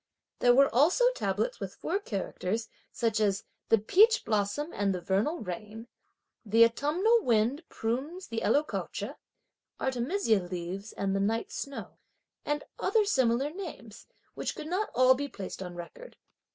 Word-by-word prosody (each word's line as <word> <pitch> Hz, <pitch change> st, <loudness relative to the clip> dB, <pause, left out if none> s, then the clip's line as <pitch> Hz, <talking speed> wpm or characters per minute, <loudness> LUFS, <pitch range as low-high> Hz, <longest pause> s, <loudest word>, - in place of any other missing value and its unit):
There 245 Hz, 0 st, +5 dB
were 275 Hz, +1 st, +5 dB
also 320 Hz, -, +4 dB
tablets -, -, -2 dB
with -, -, -6 dB
four 390 Hz, -, -2 dB
characters 215 Hz, -, -3 dB, 0.2 s
such 225 Hz, -2 st, 0 dB
as: 205 Hz, -2 st, +1 dB, 0.3 s
"the 225 Hz, -, +6 dB
peach 420 Hz, -, +4 dB
blossom 215 Hz, +9 st, 0 dB
and 200 Hz, -2 st, 0 dB
the -, -, -3 dB
vernal 200 Hz, -, 0 dB
rain;" 210 Hz, +5 st, -6 dB, 0.6 s
"the 225 Hz, +1 st, +6 dB
autumnal 340 Hz, -, +2 dB
wind 235 Hz, -, +2 dB
prunes 275 Hz, +11 st, -3 dB
the 225 Hz, 0 st, -4 dB
Eloecocca," 300 Hz, +2 st, 0 dB
"the -, -, -10 dB, 0.6 s
artemisia 250 Hz, -, +1 dB
leaves 180 Hz, +3 st, -5 dB
and 195 Hz, -1 st, -1 dB
the -, -, +1 dB
night 220 Hz, +3 st, 0 dB
snow," 280 Hz, 0 st, -6 dB, 0.4 s
and 295 Hz, 0 st, -1 dB, 0.2 s
other 440 Hz, -2 st, +2 dB
similar 260 Hz, -, +2 dB
names 305 Hz, -, -9 dB, 0.3 s
which -, -, -3 dB
could 310 Hz, -, -7 dB
not 370 Hz, +7 st, -1 dB
all 255 Hz, +1 st, +6 dB
be 285 Hz, +2 st, -3 dB
placed 195 Hz, -7 st, -7 dB
on 180 Hz, -2 st, -6 dB
record. 175 Hz, -, -10 dB
235 Hz, 150 wpm, -29 LUFS, 205-305 Hz, 0.6 s, the